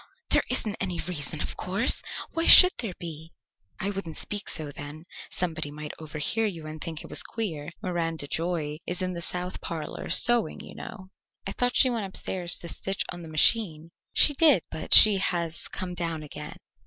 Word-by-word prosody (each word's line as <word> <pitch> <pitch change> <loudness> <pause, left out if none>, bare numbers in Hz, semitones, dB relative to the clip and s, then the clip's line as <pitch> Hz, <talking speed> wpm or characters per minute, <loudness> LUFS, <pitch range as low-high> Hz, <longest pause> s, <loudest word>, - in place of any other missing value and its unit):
"There - - +4
isn't 215 -1 +1
any 180 -3 -3
reason, 155 -4 -3
of - - -4
course. 195 +7 -1 0.3
Why 330 0 -2
should 365 - +11
there 210 -7 -4
be?" 160 -1 -9 0.5
"I 200 - -2
wouldn't 190 -5 -7
speak 205 -1 -4
so, 155 -3 -2
then. 145 +3 -10 0.2
Somebody 160 -4 -3
might 150 0 -8
overhear 155 +8 -1
you 165 -6 -8
and 155 0 -9
think 160 -2 -6
it - - -12
was - - +3
queer. 165 -10 -5
Miranda 165 -4 -3
Joy 155 -1 -3
is 180 +1 -2
in 185 0 -3
the 170 - -7
south 180 +1 -5
parlour 155 -3 -7
sewing, 240 -3 +2
you - - -11
know." 195 -5 -11 0.3
"I 195 - -3
thought 245 +4 -2
she 255 - +5
went 225 -4 -3
upstairs 180 -2 +1
to 170 - -8
stitch 195 +3 -3
on 175 - -9
the 165 - -11
machine." 160 0 +2 0.2
"She 295 - +7
did, 290 - +3
but 155 - +2
she 210 -2 +9
has 170 -3 -1
come 180 -1 -5
down 165 -3 -4
again." 150 0 -10
175 Hz, 185 wpm, -25 LUFS, 155-195 Hz, 0.5 s, should